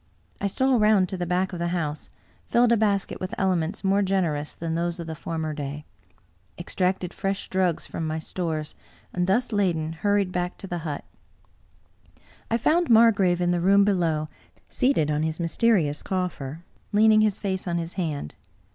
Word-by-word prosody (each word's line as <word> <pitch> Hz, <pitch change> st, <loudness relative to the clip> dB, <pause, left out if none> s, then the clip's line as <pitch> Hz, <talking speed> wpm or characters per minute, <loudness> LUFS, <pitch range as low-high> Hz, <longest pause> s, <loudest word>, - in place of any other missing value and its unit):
I 200 Hz, -, +1 dB
stole 260 Hz, +4 st, +2 dB
round 210 Hz, -3 st, +4 dB
to 195 Hz, -, -3 dB
the 175 Hz, -1 st, -3 dB
back 185 Hz, +2 st, 0 dB
of 175 Hz, -, -5 dB
the 170 Hz, -, -1 dB
house, 160 Hz, -4 st, -3 dB, 0.4 s
filled 240 Hz, 0 st, +3 dB
a -, -, +6 dB
basket 205 Hz, -3 st, 0 dB
with 185 Hz, 0 st, -4 dB
elements 185 Hz, 0 st, 0 dB
more 195 Hz, +1 st, +3 dB
generous 175 Hz, -7 st, -1 dB
than 165 Hz, -1 st, -4 dB
those 170 Hz, +1 st, -2 dB
of 170 Hz, -, -5 dB
the 160 Hz, -, -5 dB
for 165 Hz, +1 st, -5 dB
mer 155 Hz, -1 st, -2 dB
day; 145 Hz, 0 st, -6 dB, 0.7 s
extracted 180 Hz, +1 st, -1 dB
fresh 195 Hz, 0 st, -3 dB
drugs 185 Hz, -3 st, +1 dB
from 160 Hz, -, -4 dB
my 155 Hz, 0 st, -2 dB
stores, 160 Hz, -1 st, -3 dB, 0.4 s
and, 180 Hz, 0 st, 0 dB
thus 235 Hz, +6 st, +1 dB
laden, 170 Hz, -6 st, 0 dB
hurried 200 Hz, +2 st, +1 dB
back 180 Hz, 0 st, -2 dB
to -, -, -8 dB
the 175 Hz, -2 st, -4 dB
hut. 155 Hz, -3 st, -5 dB, 1.4 s
I 230 Hz, -, +2 dB
found 335 Hz, +8 st, +2 dB
Margrave 205 Hz, -6 st, +5 dB
in 175 Hz, 0 st, +2 dB
the 175 Hz, -1 st, 0 dB
room 200 Hz, +2 st, +5 dB
below, 165 Hz, -6 st, +1 dB, 0.4 s
seated 250 Hz, -, +2 dB
on 150 Hz, 0 st, 0 dB
his 160 Hz, +1 st, -2 dB
mysterious 170 Hz, -4 st, +2 dB
coffer, 170 Hz, -5 st, -3 dB, 0.3 s
leaning 215 Hz, +1 st, +5 dB
his 215 Hz, -2 st, +2 dB
face 190 Hz, -2 st, -3 dB
on 170 Hz, -1 st, 0 dB
his 170 Hz, 0 st, -4 dB
hand. 155 Hz, -, -3 dB
180 Hz, 175 wpm, -25 LUFS, 160-200 Hz, 1.4 s, a